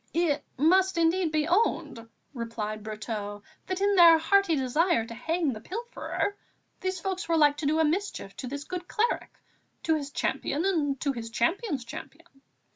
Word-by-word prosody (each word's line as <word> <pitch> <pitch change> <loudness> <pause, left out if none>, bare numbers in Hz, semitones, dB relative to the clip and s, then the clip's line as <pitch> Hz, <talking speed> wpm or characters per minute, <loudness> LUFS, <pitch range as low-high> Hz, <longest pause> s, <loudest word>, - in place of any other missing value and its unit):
"It 310 -4 +1
must 370 +5 +4
indeed 335 0 +2
be 305 0 +1
owned," 335 - 0 0.2
replied 225 -3 -4
Brotteaux, 210 -1 -5 0.2
"that 370 0 -3
in 405 0 +3
their 340 -3 +9
hearty 350 +1 +3
desire 280 +1 +2
to 230 - -8
hang 320 +4 -1
the 215 - -8
pilferer, 440 - -3 0.4
these 375 -1 -2
folks 380 +1 -3
were 330 - +3
like 295 -2 +5
to 295 -1 -2
do 310 +2 +2
a 320 - +4
mischief 320 - -2
to 255 - -5
this 285 +3 -5
good 360 +2 -6
cleric, 460 +2 -1 0.5
to 320 - +2
his 290 -3 -2
champion 295 +3 -1
and 295 -8 +1
to 280 - +1
his 230 -3 -6
champion's 280 - -1
champion. 305 +7 -9
315 Hz, 170 wpm, -28 LUFS, 250-365 Hz, 0.5 s, their